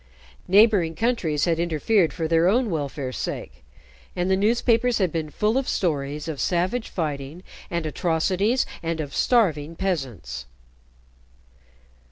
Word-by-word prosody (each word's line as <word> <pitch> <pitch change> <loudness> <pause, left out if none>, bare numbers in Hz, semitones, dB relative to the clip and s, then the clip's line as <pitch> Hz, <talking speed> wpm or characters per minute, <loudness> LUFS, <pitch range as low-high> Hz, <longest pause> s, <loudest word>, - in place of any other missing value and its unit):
Neighboring 195 -4 +4
countries 205 -11 0
had 165 -2 +1
interfered 170 +3 +2
for 165 -3 -3
their 165 +1 +3
own 230 +2 +2
welfare's 140 -4 -3
sake, 65 - -5 0.5
and 180 +1 0
the - - +5
newspapers 230 +3 +2
had 185 -5 +1
been 160 -1 -3
full 215 - +1
of 270 - -3
stories 150 -3 -1
of 155 -4 -4
savage 185 +7 0
fighting 150 0 -4 0.3
and 170 -2 -2
atrocities, 185 - +1 0.2
and 165 -1 -2
of 145 -2 -4
starving 165 - +2
peasants. 120 - -3
170 Hz, 130 wpm, -24 LUFS, 150-205 Hz, 0.5 s, the